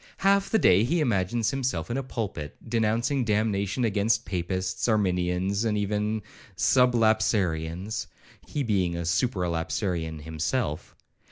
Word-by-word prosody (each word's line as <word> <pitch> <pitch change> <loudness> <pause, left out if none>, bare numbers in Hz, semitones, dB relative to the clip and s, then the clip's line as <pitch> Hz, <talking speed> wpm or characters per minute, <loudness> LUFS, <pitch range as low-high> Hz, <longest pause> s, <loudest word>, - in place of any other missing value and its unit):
Half 200 0 +4
the 220 - +3
day 95 - +5
he 170 +9 +1
imagines 115 - +1
himself 125 -10 -2
in - - -1
a - - 0
pulpit, 105 - -5
denouncing 115 +4 +1
damnation 105 0 0
against 105 +1 +1
Papists, 95 +1 -2
Arminians, 95 -1 +1
and 110 -2 0
even 105 +1 -1 0.3
Sublapsarians, 110 -7 +2 0.4
(he 145 - -2
being 95 -7 0
a 85 0 -3
Supra 90 +2 0
lapsarian 80 -1 -2
himself). 80 - -2
105 Hz, 120 wpm, -26 LUFS, 90-115 Hz, 0.4 s, day